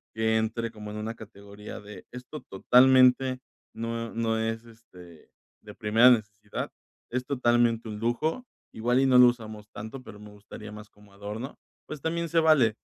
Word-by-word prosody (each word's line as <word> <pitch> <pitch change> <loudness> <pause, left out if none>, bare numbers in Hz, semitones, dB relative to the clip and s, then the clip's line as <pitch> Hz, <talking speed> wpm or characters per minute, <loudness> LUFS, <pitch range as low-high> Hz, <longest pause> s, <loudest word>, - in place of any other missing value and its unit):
que 110 0 +2
entre 110 +1 -2
como 105 -2 -9
en 105 - -6
una 110 +2 -4
categoría 100 -1 -11
de: 105 0 -12
"Esto 125 +5 -9
totalmente 130 +4 +4 0.4
no 115 0 -4
no 115 -1 0
es, 115 +1 -3
este, 90 -8 -16 0.3
de 105 -1 -11
primera 115 +3 +5
necesidad, 105 -3 -2 0.4
es 125 +1 -3
totalmente 120 -4 +1
un 105 -1 -6
lujo, 155 - -1 0.3
igual 120 +3 +1
y 135 - +3
no 130 -1 +5
lo 125 0 +9
usamos 110 -3 -4
tanto, 110 +6 -8
pero 105 - -12
me 105 0 -12
gustaría 105 +1 -11
más 105 0 -11
como 105 -1 -21
adorno", 105 +7 -7 0.3
pues 150 -2 -7
también 170 +2 -2
se 165 +1 +3
vale, 140 -9 +4
115 Hz, 165 wpm, -27 LUFS, 105-125 Hz, 0.4 s, lo